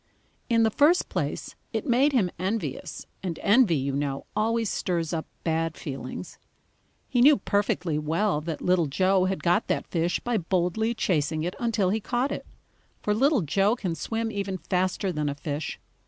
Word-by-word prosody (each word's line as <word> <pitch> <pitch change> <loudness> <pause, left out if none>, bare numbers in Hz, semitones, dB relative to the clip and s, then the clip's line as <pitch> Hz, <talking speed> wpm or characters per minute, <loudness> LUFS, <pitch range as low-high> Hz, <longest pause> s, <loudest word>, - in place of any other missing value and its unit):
In 230 -1 +4
the 220 - +3
first 305 +10 +4
place - - -3 0.2
it - - -2
made 270 +3 +4
him 210 -10 +2
envious, 200 +4 -3 0.2
and 175 -4 -3
envy, 210 -4 +5
you 135 -1 -1
know, 140 -1 -2
always 225 +1 +1
stirs 170 -4 -1
up 160 -1 -3 0.2
bad 165 0 -1
feelings. 135 -3 -7 0.7
He 245 -3 +1
knew 290 +4 +7
perfectly 190 -6 0
well 160 +2 0
that 160 0 -5
Little 180 -3 +3
Joe 185 +5 +2
had 190 0 -2
got 175 0 +2
that - - 0
fish 170 0 0
by 240 -3 0
boldly 185 +6 0
chasing 155 -6 0
it 175 +2 -2
until 220 -6 +1
he 220 - +1
caught 245 +5 -1
it, - - -5 0.6
for 210 - +2
Little 270 +3 +3
Joe 195 +8 +2
can 185 -8 -3
swim 225 +8 -2
even 200 -2 -3
faster 185 +1 -1
than 150 -3 -1
a 140 - -3
fish. 145 +1 -4
185 Hz, 170 wpm, -26 LUFS, 165-225 Hz, 0.7 s, knew